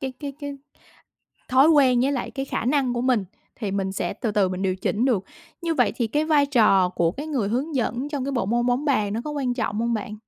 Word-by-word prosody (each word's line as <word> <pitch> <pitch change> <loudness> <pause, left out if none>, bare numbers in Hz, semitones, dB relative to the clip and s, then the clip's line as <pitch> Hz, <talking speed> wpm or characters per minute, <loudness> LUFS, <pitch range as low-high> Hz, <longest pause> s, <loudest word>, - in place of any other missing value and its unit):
cái 265 -2 -4
cái 285 -2 -5
cái 285 -1 -5 0.9
thói 265 +4 +5
quen 265 -6 +5
với 275 +3 +2
lại 260 - -3
cái 270 - -4
khả 265 - -3
năng 260 -1 +1
của 240 - -1
mình 245 -5 +1 0.3
thì 210 -5 -3
mình 190 -1 -2
sẽ - - -2
từ 225 - -2
từ 205 -2 +2
mình 185 +1 -4
điều 185 -1 0
chỉnh 210 +5 -1
được. 215 -8 +1 0.4
Như 330 -1 0
vậy - - +2
thì 235 - 0
cái 295 +7 0
vai 300 -3 +3
trò 210 -9 +4
của 175 -2 0
cái 290 +6 -6
người 260 -10 -1
hướng 275 +7 -2
dẫn 245 +2 -1
trong 285 -3 -3
cái 280 - -3
bộ 240 -7 -1
môn 240 +3 +1
bóng 250 +4 +1
bàn 215 -9 +1
nó 225 - -2
có 300 - -4
quan 265 -4 -1
trọng 220 -3 -2
hông 235 0 0
bạn? 215 0 -4
245 Hz, 255 wpm, -24 LUFS, 210-280 Hz, 0.9 s, thói